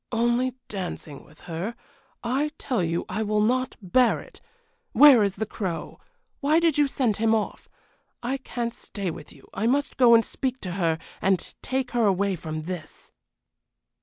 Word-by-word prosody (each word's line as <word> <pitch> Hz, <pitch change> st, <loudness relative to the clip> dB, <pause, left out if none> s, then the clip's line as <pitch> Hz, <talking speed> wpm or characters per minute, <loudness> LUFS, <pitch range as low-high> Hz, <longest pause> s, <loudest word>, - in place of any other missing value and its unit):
"Only 240 Hz, +2 st, +1 dB
dancing 180 Hz, -7 st, -6 dB
with 150 Hz, -, -20 dB
her! 175 Hz, +7 st, -4 dB, 0.5 s
I 265 Hz, +5 st, 0 dB
tell 250 Hz, -7 st, -1 dB
you 170 Hz, 0 st, -1 dB
I 215 Hz, -, -3 dB
will 215 Hz, 0 st, +1 dB
not 255 Hz, +4 st, +1 dB
bear 235 Hz, +7 st, +3 dB
it. -, -, -14 dB, 0.5 s
Where 280 Hz, -5 st, +8 dB
is 200 Hz, -2 st, +1 dB
the 220 Hz, -, -2 dB
Crow? 190 Hz, -6 st, -5 dB, 0.4 s
Why 300 Hz, +3 st, +3 dB
did 335 Hz, -3 st, +2 dB
you 295 Hz, -1 st, +4 dB
send 250 Hz, -6 st, 0 dB
him 225 Hz, 0 st, +3 dB
off? 215 Hz, -2 st, -3 dB, 0.5 s
I 260 Hz, +3 st, -1 dB
can't 240 Hz, -3 st, -4 dB
stay 195 Hz, -6 st, -5 dB
with 155 Hz, -1 st, -10 dB
you; 140 Hz, -, -17 dB
I 220 Hz, +4 st, 0 dB
must 280 Hz, +4 st, 0 dB
go 240 Hz, -2 st, +7 dB
and 230 Hz, -, +4 dB
speak 260 Hz, -1 st, -3 dB
to 185 Hz, -, -4 dB
her, 170 Hz, -3 st, 0 dB, 0.2 s
and 190 Hz, -2 st, +1 dB
take 260 Hz, -1 st, -2 dB
her 240 Hz, -2 st, +2 dB
away 200 Hz, 0 st, +2 dB
from 155 Hz, -1 st, -5 dB
this." 170 Hz, -2 st, -7 dB
220 Hz, 170 wpm, -25 LUFS, 185-255 Hz, 0.5 s, Where